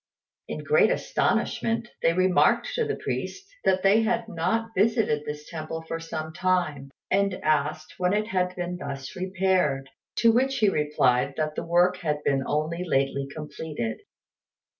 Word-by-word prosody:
In - - -5
great 470 +1 +4
astonishment, 230 0 0
they 165 - +3
remarked 185 +1 +3
to 470 - 0
the 435 - -1
priest 395 - -4 0.2
that 185 0 +3
they 200 +3 +5
had 230 0 0
not 225 +5 -1
visited 205 -8 +2
this 150 0 -6
temple 160 0 -5
for 165 0 -4
some 160 -1 -5
time, 155 -7 0 0.2
and 195 -1 +2
asked 155 +2 0
when 180 0 +2
it 210 +1 +1
had 185 -4 -1
been 180 0 -3
thus 140 -4 -6
repaired; 185 -7 0 0.2
to 230 - +5
which 265 +3 +2
he 210 -3 +4
replied 140 -4 +1
that 155 -1 -1
the - - -3
work 175 +2 +3
had 150 -3 -2
been 135 -1 +2
only 155 +4 -1
lately 135 -4 0
completed. 150 -5 -5
170 Hz, 155 wpm, -26 LUFS, 150-195 Hz, 0.2 s, they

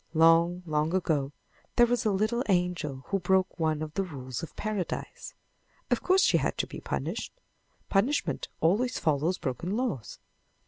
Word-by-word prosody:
Long, 165 +2 +5
long 155 +2 0
ago 150 -7 0 0.4
there 240 - +7
was 245 0 0
a 215 - +3
little 215 +5 +1
angel 175 -7 0
who 195 - +1
broke 185 0 +1
one 155 -1 +1
of 155 -1 -6
the 195 - 0
rules 130 -9 -5
of 165 - -8
Paradise. 210 -5 -4 0.6
Of - - +2
course 375 +1 +4
she - - +4
had - - -1
to - - 0
be - - -8
punished. - - -3 0.6
Punishment 195 - +1
always 215 +10 +2
follows 155 +4 +1
broken 170 - -3
laws. 195 - -3
175 Hz, 155 wpm, -29 LUFS, 155-205 Hz, 0.6 s, there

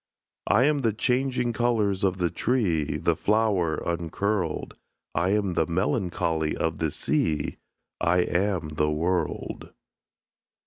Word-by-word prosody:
I 110 +5 +4
am 145 +1 +3
the 115 -5 +1
changing 125 +1 0
colours 110 -4 +1
of 95 -1 +2
the 90 -3 0
tree; 90 - 0
The - - +1
flower 100 -6 +1
uncurled: 85 +1 -2 0.4
I 85 +4 +1
am 100 -2 +1
the 80 -2 +1
melancholy 90 - 0
of 80 -1 -1
the 80 - +1
sea; 75 +2 -1 0.4
I 90 +1 +3
am 90 -3 0
the 75 0 0
world. 85 +2 -2
90 Hz, 125 wpm, -26 LUFS, 80-110 Hz, 0.4 s, I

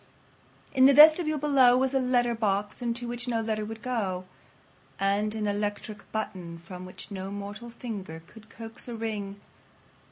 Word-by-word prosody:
In 260 -1 +6
the 275 0 +7
vestibule 310 +1 +7
below 270 -4 +5
was 265 +1 +1
a 270 - +3
letter 245 -2 +2
box 210 -1 -1
into 240 0 -2
which 240 +1 -5
no 235 -2 0
letter 220 -1 -1
would 220 +1 -7
go, 195 -8 -2 0.7
and 205 +2 +1
an 215 -1 -2
electric 205 0 -3
button 180 -6 -4
from 180 +2 -9
which 185 - -10
no 190 -1 -5
mortal 205 +3 -7
finger 200 -9 -7
could 215 +2 -16
coax 225 +1 -8
a 240 - -5
ring. 205 -3 -4
220 Hz, 160 wpm, -28 LUFS, 200-245 Hz, 0.7 s, the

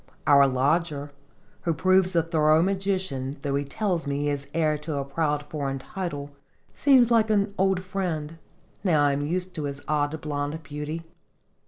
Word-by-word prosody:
Our 140 -2 +6
lodger, 145 +2 0 0.5
who 165 -2 0
proves 185 0 +3
a 165 - +4
thorough 155 -1 +3
musician 185 -8 -1
though 140 -2 -1
he 140 +1 +1
tells 170 +2 -2
me 140 0 -1
he 145 - 0
is 140 -1 -3
heir 155 -1 +1
to 150 0 -4
a 140 -1 -2
proud 150 0 -1
foreign 140 -2 -3
title 145 -1 -5 0.4
seems 260 -4 +4
like 225 -2 +4
an 200 -1 +2
old 190 -1 +1
friend, 170 -5 -3 0.4
now 155 -7 +3
I 145 - +3
am 140 +1 -1
used 180 +5 -2
to 150 - -4
his 140 0 -4
odd 150 +1 0
blonde 145 +1 -3
beauty. 150 +2 -5
155 Hz, 170 wpm, -26 LUFS, 145-185 Hz, 0.5 s, Our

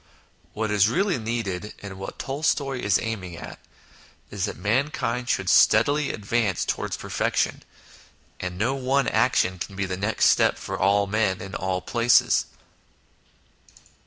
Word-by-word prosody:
What 110 0 -2
is 105 -1 +4
really 185 - +1
needed, 110 -3 -4
and 95 -2 -8
what 95 - -7
Tolstoy 135 -1 -1
is 100 -3 +3
aiming 95 -7 -5
at, - - -9 0.7
is 100 -3 -2
that - - -6
mankind 120 +3 -1
should 95 - 0
steadily 140 +11 +4
advance 105 -2 -1
towards - - -2
perfection, - - -1 0.8
and 90 -1 -5
no 115 +7 +1
one 135 +1 0
action 90 0 +2
can 100 - -6
be 100 0 -1
the 90 -1 -4
next 100 +3 +1
step - - +3
for - - -5
all 100 +1 +2
men 100 -2 0
in 95 0 -8
all 95 -1 -2
places. 120 +3 +3
105 Hz, 140 wpm, -24 LUFS, 95-120 Hz, 0.8 s, is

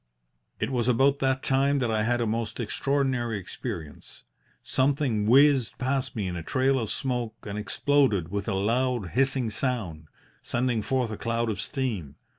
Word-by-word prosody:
"It - - -1
was 120 -2 0
about 135 +3 +3
that 130 0 0
time 140 +1 +2
that 120 -4 0
I 110 -1 +1
had 120 +2 +1
a - - +1
most 115 +1 -2
extraordinary 130 -1 0
experience. 80 -5 -7 0.4
Something 130 -6 +1
whizzed 135 -2 +5
past 130 0 -1
me 105 -4 -2
in 90 -1 -3
a 85 - -4
trail 130 +9 +1
of 110 -4 -3
smoke 120 -4 -2
and 100 -1 -6
exploded 105 - +1
with 100 +2 -3
a 105 - 0
loud, 115 +1 0
hissing 130 -1 +1
sound, 105 - -2 0.3
sending 120 -2 0
forth 125 0 -1
a 110 - -5
cloud 115 0 -1
of 100 - -3
steam. 110 - -3
120 Hz, 165 wpm, -27 LUFS, 105-135 Hz, 0.4 s, whizzed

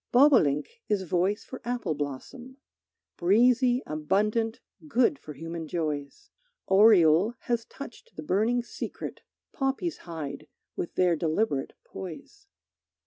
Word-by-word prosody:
Bobolink 250 - +4
is 205 -2 +1
voice 185 +4 0
for 260 - -9
apple 240 -9 -2
blossom, 155 - -6 0.6
Breezy, 245 +7 +4
abundant, 210 +9 0 0.3
good 255 +1 +2
for 150 - -9
human 165 +1 -6
joys; 150 -4 -4 0.3
Oriole 190 0 +5
has 235 -2 -1
touched 275 -4 -11
the 155 - -6
burning 220 +9 +1
secret - - -7 0.3
Poppies 275 +5 -1
hide 155 -3 -7 0.3
with 175 - -4
their 180 -2 +3
deliberate 160 -2 -1
poise. 190 - -10
200 Hz, 110 wpm, -28 LUFS, 160-245 Hz, 0.6 s, Oriole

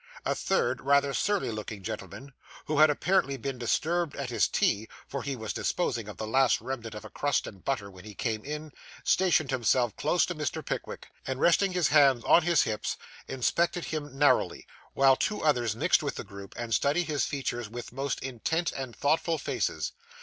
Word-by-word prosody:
A - - +2
third 120 +1 0
rather 140 0 +3
surly 205 - 0
looking 105 -2 -6
gentleman, 135 +8 -7 0.3
who 150 -1 0
had 155 0 +8
apparently 150 -2 +1
been 135 0 -4
disturbed 160 +6 0
at 135 -3 -4
his - - +3
tea, 110 +2 +1 0.2
for 140 - -4
he 140 -1 -3
was 110 -3 -4
disposing 115 - -1
of 105 - -8
the 110 - -4
last 130 +2 +3
remnant 115 -4 -5
of 105 - -8
a - - -8
crust 145 0 0
and 95 -3 -10
butter 105 -8 -2
when 90 -1 -13
he 105 -1 -10
came 110 0 -2
in, 150 +1 -6 0.3
stationed 170 -7 +3
himself 120 -2 +2
close 155 +5 +2
to 180 - -3
Mr. 150 -3 -3
Pickwick; - - -5 0.2
and, 130 0 -2
resting 185 +4 +3
his 180 -6 +2
hands 140 -5 +5
on 175 - +6
his 170 -1 +3
hips, 110 -1 -2 0.3
inspected 170 +7 0
him 145 -3 -5
narrowly; 145 0 +2 0.3
while 135 -1 +6
two 210 +9 -1
others 120 -8 +2
mixed 160 +10 +3
with 145 -2 -3
the - - -5
group, 100 -2 -11
and 120 -1 -3
studied 145 +8 +2
his 150 -3 0
features 120 -5 -3
with 120 +1 -8
most 135 +1 -2
intent 140 +7 -1
and 130 -4 -6
thoughtful 160 +5 +1
faces. - - -2
135 Hz, 190 wpm, -29 LUFS, 115-155 Hz, 0.3 s, had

